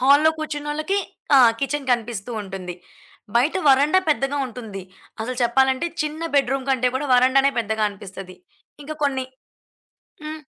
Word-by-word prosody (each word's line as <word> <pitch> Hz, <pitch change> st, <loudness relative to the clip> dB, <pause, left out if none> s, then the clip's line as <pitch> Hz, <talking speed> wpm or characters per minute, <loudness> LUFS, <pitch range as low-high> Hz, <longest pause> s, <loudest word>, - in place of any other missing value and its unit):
హాల్‌లో 285 Hz, +4 st, +5 dB
కూర్చున్నోళ్ళకి 310 Hz, +4 st, -2 dB, 0.4 s
ఆ! -, -, +8 dB, 0.2 s
కిచెన్ 275 Hz, 0 st, -2 dB
కనిపిస్తూ 235 Hz, -2 st, -3 dB
ఉంటుంది. 190 Hz, -2 st, -7 dB, 0.6 s
బయట 260 Hz, +6 st, +2 dB
వరండా 285 Hz, +7 st, +5 dB
పెద్దగా 280 Hz, -1 st, 0 dB
ఉంటుంది. 220 Hz, -5 st, -8 dB, 0.4 s
అసలు 245 Hz, +3 st, -4 dB
చెప్పాలంటే 265 Hz, +5 st, +2 dB, 0.2 s
చిన్న 305 Hz, +2 st, -5 dB
బెడ్రూమ్ 270 Hz, 0 st, +1 dB
కంటే 255 Hz, -2 st, +2 dB
కూడా 290 Hz, +2 st, -3 dB
వరండానే 265 Hz, +2 st, +4 dB
పెద్దగా 220 Hz, -1 st, 0 dB
అనిపిస్తది. 195 Hz, -1 st, -10 dB, 0.5 s
ఇంకా 310 Hz, +2 st, -6 dB
కొన్ని 265 Hz, -2 st, 0 dB, 1.0 s
హ్మ్. 310 Hz, 0 st, -6 dB
265 Hz, 125 wpm, -22 LUFS, 235-290 Hz, 1.0 s, ఆ